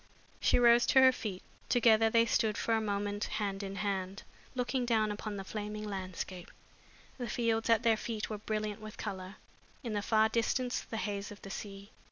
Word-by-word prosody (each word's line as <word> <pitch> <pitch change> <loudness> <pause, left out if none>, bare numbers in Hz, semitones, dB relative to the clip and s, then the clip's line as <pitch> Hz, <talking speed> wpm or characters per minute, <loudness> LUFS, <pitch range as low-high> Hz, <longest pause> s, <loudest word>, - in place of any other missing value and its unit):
She - - +3
rose 240 0 +6
to 265 - +6
her 260 0 +8
feet. 210 -7 -5 0.3
Together 225 -2 +5
they 230 +1 +4
stood, 220 -2 +1
for 230 - 0
a 220 - +2
moment, 205 0 -1
hand 200 -2 -2
in 195 0 -5
hand, 195 -1 -3 0.3
looking 250 0 0
down 220 -3 +2
upon 210 0 -5
the 195 - -5
flaming 210 +1 -5
landscape. 185 -2 -5 0.7
The 245 -2 -3
fields 225 0 0
at 230 -2 +4
their 225 -1 +4
feet 220 -1 -3
were 215 -1 -5
brilliant 215 -1 -3
with 215 0 -9
color; 190 0 -5 0.5
in 230 -3 -3
the 205 - 0
far 220 +1 +3
distance 240 +3 0
the 225 - -6
haze 205 -2 -3
of 205 - -12
the 195 - -8
sea. 200 +1 -7
215 Hz, 190 wpm, -32 LUFS, 200-230 Hz, 0.7 s, her